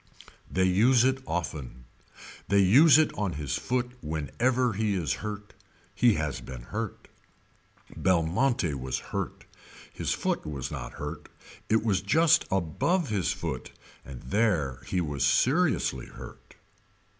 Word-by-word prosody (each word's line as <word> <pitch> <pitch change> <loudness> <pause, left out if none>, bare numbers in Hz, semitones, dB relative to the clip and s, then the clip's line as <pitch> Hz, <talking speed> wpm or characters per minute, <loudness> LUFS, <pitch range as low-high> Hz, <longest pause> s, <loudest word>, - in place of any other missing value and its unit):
They 95 - +1
use 115 +7 +4
it 130 +1 +2
often. 70 -8 -4 0.6
They 100 - +2
use 130 - +7
it 155 -1 +3
on 100 -4 -2
his 75 -3 -3
foot 125 0 -1
whenever 115 - 0
he 105 0 0
is 85 -7 0
hurt. 105 -1 -6 0.4
He 120 -3 +4
has 75 -3 -3
been 65 -2 -9
hurt. - - -5 0.9
Belmonte 90 - +1
was 65 -1 -3 0.2
hurt. - - -4 0.5
His - - -3
foot - - -1
was 70 -4 -5
not - - -6
hurt. - - -7 0.4
It 110 0 +3
was 105 -4 +1
just 160 +9 +4
above 95 - 0
his 100 -4 0
foot - - -5 0.3
and 65 -2 -10
there 85 - 0
he 90 - 0
was 75 -4 -2
seriously 140 - +2
hurt. - - -12
95 Hz, 135 wpm, -28 LUFS, 75-125 Hz, 0.9 s, use